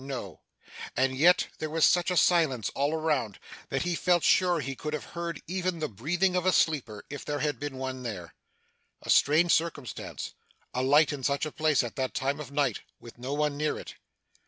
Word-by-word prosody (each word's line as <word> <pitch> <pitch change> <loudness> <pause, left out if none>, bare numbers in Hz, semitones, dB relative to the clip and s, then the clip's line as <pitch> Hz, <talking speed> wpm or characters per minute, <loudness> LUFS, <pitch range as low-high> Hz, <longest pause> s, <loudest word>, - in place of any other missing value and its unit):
No. 125 - -6 0.6
And 130 +1 +2
yet 175 +6 +4
there 155 - -3
was 160 +1 +3
such 175 0 +3
a 180 - 0
silence 155 - +3
all 140 +2 0
around, 150 -10 -1 0.3
that - - -1
he 175 0 -1
felt 175 0 +2
sure 180 -2 +4
he 135 -2 -4
could 150 +3 -5
have 150 - -5
heard 170 0 -5
even 185 0 -2
the 155 -1 -2
breathing 170 - 0
of 180 - +1
a 185 - +3
sleeper, 130 - 0
if 145 - -6
there 145 -1 -3
had 150 0 -1
been 145 -2 -5
one 130 -1 -4
there. 105 -8 -6 0.7
A - - -1
strange 160 +4 +4
circumstance, 155 -7 -3 0.4
a 125 - -1
light 145 +3 +4
in 140 - -5
such 140 +3 +1
a 155 - -5
place 155 -3 +2
at 120 +4 -7
that 130 -1 -2
time 140 +2 -1
of 145 -2 -8
night, 140 0 0 0.2
with 120 0 -13
no 130 +3 -4
one 150 0 0
near 150 +1 -1
it. - - -9
150 Hz, 205 wpm, -28 LUFS, 130-165 Hz, 0.7 s, yet